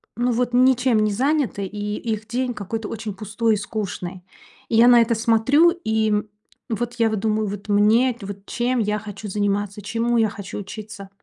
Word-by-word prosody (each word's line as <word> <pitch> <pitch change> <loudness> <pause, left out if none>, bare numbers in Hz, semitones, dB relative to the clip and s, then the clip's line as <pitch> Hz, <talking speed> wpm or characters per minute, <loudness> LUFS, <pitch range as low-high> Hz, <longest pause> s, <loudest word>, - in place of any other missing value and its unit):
ну, 245 +1 +1
вот 245 +1 0
ничем 250 -2 +4
не 215 - +1
заняты, 260 -3 0
и 210 +2 -4 0.2
их 215 0 -6
день 245 +1 -1
какой-то 215 +1 -5
очень 220 -1 -5
пустой 215 +2 0
и - - -2
скучный. 195 -3 -5 0.5
И - - 0
я 235 +2 +7
на 240 -1 +7
это 230 0 +2
смотрю, 235 +9 +4
и 220 -1 +1 0.6
вот 240 +2 -2
я 225 -1 +4
вот 215 -2 -2
думаю, 215 -1 0
вот 200 +1 -7
мне, 220 +5 +4
вот 200 0 -8
чем 245 +4 -1
я 210 -1 0
хочу 210 0 -8
заниматься, 205 0 -1
чему 230 +3 0
я 220 -2 +3
хочу 200 -1 -7
учиться. 205 0 -8
220 Hz, 180 wpm, -22 LUFS, 205-240 Hz, 0.6 s, я